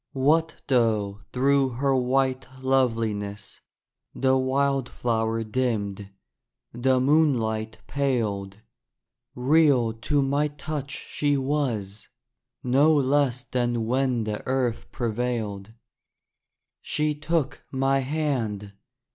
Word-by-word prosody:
What 160 +5 +2
though 110 -6 +1
through 135 0 +2
her 135 +2 +1
white 130 +1 +1 0.2
loveliness 115 -6 -1 0.5
The 130 0 +2
wildflower 130 -4 0
dimmed, 105 -4 -2 0.6
the 130 +2 +2
moonlight 120 -7 +1
paled, 110 -8 -2 0.7
Real 130 -3 +3
to 140 +5 0
my 140 +2 +1
touch 145 -1 -5 0.2
she 145 -1 0
was; 130 -8 -2 0.6
no 140 +5 +4
less 135 -2 +2
Than 120 -2 -1
when 125 -1 +1
the 105 -1 -3
earth 130 -3 -1
prevailed. 110 -4 -3 1.1
She 150 0 0
took 150 -1 -2
my 135 0 +2
hand. 130 -8 -2
130 Hz, 90 wpm, -25 LUFS, 110-140 Hz, 1.1 s, no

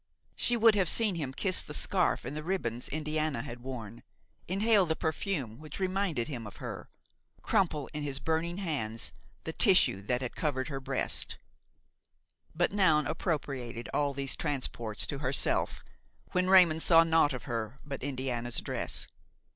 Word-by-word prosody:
She 240 - +3
would 225 -1 +6
have 195 -4 +2
seen 220 -4 +4
him 150 -6 -3
kiss 185 +7 +2
the 150 - -2
scarf 185 -3 +1
and 145 - -5
the 155 - -3
ribbons 140 -9 -2
Indiana 155 -4 -2
had 120 +1 -8
worn, 120 -3 -7 0.5
inhale 200 +1 +3
the 160 - 0
perfume 155 - -3
which 155 +2 -8
reminded 185 -9 -1
him 120 -7 -6
of 100 - -11
her, - - -7 0.5
crumple 170 -9 +1
in 150 - -4
his 140 -2 -3
burning 160 +4 -1
hands 135 - -2 0.3
the - - -5
tissue 95 - +4
that 125 +5 -1
had 125 - -5
covered 140 -3 -2
her 135 -2 -4
breast; 135 -1 +1 1.2
but 175 +2 +1
Noun 165 -7 +3
appropriated 130 -9 -3
all 145 -1 +1
these 135 -1 -1
transports 125 -7 -2
to 140 - -5
herself, 135 -1 +1 0.5
when 185 0 +1
Raymon 180 -4 +6
saw 165 0 +6
naught 165 -2 +3
of 125 - -5
her 115 -1 -4
but 140 -2 -6
Indiana's 125 -3 -2
dress. - - -3
150 Hz, 155 wpm, -30 LUFS, 130-175 Hz, 1.2 s, would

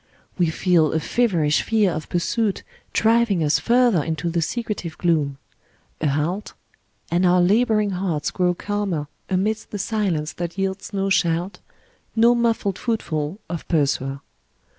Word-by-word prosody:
We 175 -3 +2
feel 160 -2 +2
a 160 - +2
feverish 165 -6 +1
fear 215 -4 +2
of 155 -1 -5
pursuit 200 +4 0 0.3
driving 225 -5 +3
us 150 0 +2
further 240 -8 +3
into 160 +1 -2
the 170 0 0
secretive 205 -3 -3
gloom. 150 -5 +1 0.6
A 155 - +1
haltŌĆö 155 +8 -1 0.6
and 175 +2 +2
our 180 0 +4
labouring 210 +2 +3
hearts 180 -5 -2
grow 180 -1 +1
calmer 195 -7 -2 0.2
amidst 210 +4 -1
the 205 - -5
silence 190 -7 -1
that 175 +1 -5
yields 195 0 -3
no 195 -1 -1
shout, 175 0 +1 0.6
no 235 +1 +5
muffled 230 -5 0
footfall 165 -8 -2
of 170 -1 -6
pursuer. 140 -3 0
180 Hz, 140 wpm, -22 LUFS, 160-210 Hz, 0.6 s, no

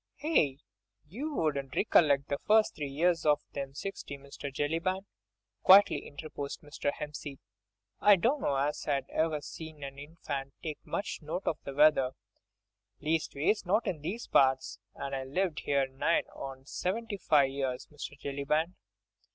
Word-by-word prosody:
"Aye! 155 - +3 0.5
you 280 - -4
wouldn't 140 - -1
rec'llect 145 -9 +4
the 140 - -2
first 215 0 +5
three 145 -2 -4
years 165 +4 +2
of 150 -1 +4
them 135 -1 -5
sixty, 170 -5 -5
Mr. 140 0 -8
Jellyband," 165 +7 -1 0.6
quietly 195 +2 +7
interposed 145 -1 -6
Mr. 145 -1 -2
Hempseed. 145 -1 -6 0.6
"I 205 -1 +7
dunno 230 - +1
as 145 +2 -1
I 140 -2 +1
ever 155 -2 0
see'd 160 +1 -8
an 140 0 -7
infant 145 -3 -6
take 155 -3 -5
much 200 - -3
note 160 +5 -4
of 155 - 0
the 140 - -6
weather, 145 -3 +5 0.9
leastways 155 +4 0
not 200 +5 +2
in 155 -5 -2
these 205 +10 -4
parts, 130 -1 +3 0.2
an' 140 0 -5
I've 135 -1 -3
lived 175 +2 -1
'ere 140 -1 +3
nigh 135 +5 +1
on 135 -1 -8
seventy 205 +7 -2
five 145 -7 +3
years, 130 -2 -2
Mr. 145 -1 -7
Jellyband." 145 +5 -1
150 Hz, 145 wpm, -31 LUFS, 140-175 Hz, 0.9 s, quietly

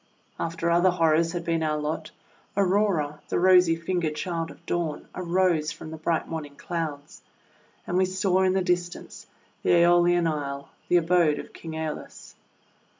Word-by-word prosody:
After 170 0 -1
other 175 +2 +4
horrors 165 -1 +2
had 170 -1 -4
been 165 -1 0
our 155 -1 0
lot, 150 +1 -3 0.5
Aurora, 185 -7 +1
the - - 0
rosy 180 -2 +5
fingered 165 -2 -2
child 165 0 -3
of - - -15
Dawn, 165 -3 -2
arose 175 -3 +1
from 155 - -9
the 160 - -7
bright 160 +1 -1
morning 150 -3 -6
Clouds, 155 -4 -5 0.6
and 175 - -1
we 190 - +4
saw 185 0 +1
in 185 0 +3
the 190 -1 +1
dis 180 -1 +1
tance - - -11 0.3
the - - -1
^Eolian 175 0 +4
Isle, 140 -3 -4 0.2
the 175 - +4
abode 170 -3 +3
of - - -9
King 165 -1 -8
^Eolus. 160 -1 -6
170 Hz, 160 wpm, -26 LUFS, 155-180 Hz, 0.6 s, rosy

